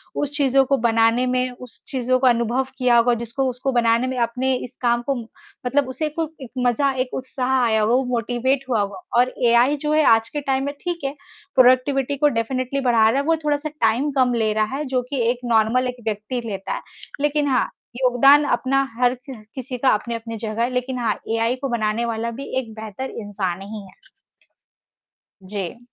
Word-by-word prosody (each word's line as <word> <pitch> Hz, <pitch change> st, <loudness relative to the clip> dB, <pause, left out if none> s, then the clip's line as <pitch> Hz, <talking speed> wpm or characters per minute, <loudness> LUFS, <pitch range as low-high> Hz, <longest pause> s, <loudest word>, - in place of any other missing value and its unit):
उस 290 Hz, 0 st, -2 dB
चीज़ों 270 Hz, -2 st, +4 dB
को 275 Hz, +1 st, +2 dB
बनाने 230 Hz, +1 st, +3 dB
में, 255 Hz, 0 st, +1 dB
उस 250 Hz, -1 st, -12 dB
चीज़ों 255 Hz, -1 st, +1 dB
का 260 Hz, 0 st, +4 dB
अनुभव 240 Hz, +2 st, +1 dB
किया 250 Hz, -2 st, +4 dB
होगा 240 Hz, +1 st, +4 dB
जिसको 235 Hz, +4 st, -2 dB
उसको 255 Hz, +2 st, -2 dB
बनाने 235 Hz, 0 st, +2 dB
में 260 Hz, 0 st, -3 dB
अपने 255 Hz, +3 st, 0 dB
इस 250 Hz, 0 st, -7 dB
काम 240 Hz, -1 st, +2 dB
को 275 Hz, -, +2 dB
मतलब 250 Hz, +3 st, -3 dB
उसे 305 Hz, +4 st, -2 dB
को 320 Hz, -2 st, -1 dB
एक 255 Hz, -, -9 dB
मज़ा, 260 Hz, +3 st, +2 dB
एक 255 Hz, -1 st, -3 dB
उत्साह 260 Hz, 0 st, -2 dB
आया 220 Hz, -2 st, +2 dB
होगा, 215 Hz, +2 st, +2 dB
वो 260 Hz, +2 st, +3 dB
मोटिवेट 250 Hz, +3 st, 0 dB
हुआ 230 Hz, -4 st, +2 dB
होगा 200 Hz, -, -4 dB, 0.2 s
और 250 Hz, +1 st, +2 dB
एआई 240 Hz, +5 st, +4 dB
जो 300 Hz, -, +1 dB
है 310 Hz, 0 st, +4 dB
आज 225 Hz, 0 st, -3 dB
के 295 Hz, -, -4 dB
टाइम 270 Hz, -1 st, 0 dB
में 285 Hz, -, -3 dB
ठीक 345 Hz, -4 st, -4 dB
है, 275 Hz, +1 st, -2 dB, 0.4 s
प्रोडक्टिविटी 260 Hz, +2 st, +4 dB
को 295 Hz, +2 st, +4 dB
डेफिनिटली 255 Hz, +3 st, -2 dB
बढ़ा 230 Hz, -4 st, +4 dB
रहा 265 Hz, +5 st, +1 dB
है, 280 Hz, -, -2 dB
वो 330 Hz, +1 st, +3 dB
थोड़ा-सा 295 Hz, +1 st, 0 dB
टाइम 270 Hz, 0 st, 0 dB
कम 250 Hz, -1 st, +3 dB
ले 220 Hz, -2 st, +1 dB
रहा 215 Hz, +4 st, 0 dB
है, 300 Hz, -, -2 dB
जो 255 Hz, -1 st, 0 dB
कि 275 Hz, -3 st, -1 dB
एक 245 Hz, -, -5 dB
नॉर्मल 235 Hz, +2 st, +2 dB
एक 250 Hz, -1 st, -6 dB
व्यक्ति 220 Hz, +3 st, -3 dB
लेता 195 Hz, -3 st, -4 dB
है। -, -, -4 dB, 0.4 s
लेकिन 295 Hz, 0 st, +1 dB
हाँ, 255 Hz, -3 st, +1 dB, 0.3 s
योगदान 265 Hz, +3 st, +5 dB
अपना 270 Hz, +2 st, +1 dB, 0.2 s
हर 245 Hz, 0 st, +3 dB, 0.2 s
च 265 Hz, -, -6 dB, 0.2 s
किसी 255 Hz, -1 st, -5 dB
का 260 Hz, +2 st, +2 dB
अपनी-अपनी 230 Hz, +1 st, -2 dB
जगह 220 Hz, 0 st, -3 dB
है 245 Hz, -, +1 dB
लेकिन 250 Hz, 0 st, -2 dB
हाँ, 235 Hz, -2 st, 0 dB
एआई 230 Hz, +2 st, +1 dB
को 275 Hz, -, -2 dB
बनाने 230 Hz, 0 st, 0 dB
वाला 230 Hz, 0 st, -2 dB
भी 270 Hz, +4 st, -7 dB
एक 230 Hz, -4 st, -8 dB
बेहतर 220 Hz, +5 st, -6 dB
इंसान 195 Hz, -3 st, -3 dB
ही 210 Hz, +2 st, -7 dB
है। 190 Hz, -1 st, -19 dB, 1.3 s
जी। 195 Hz, +1 st, -5 dB
250 Hz, 200 wpm, -22 LUFS, 230-265 Hz, 1.3 s, योगदान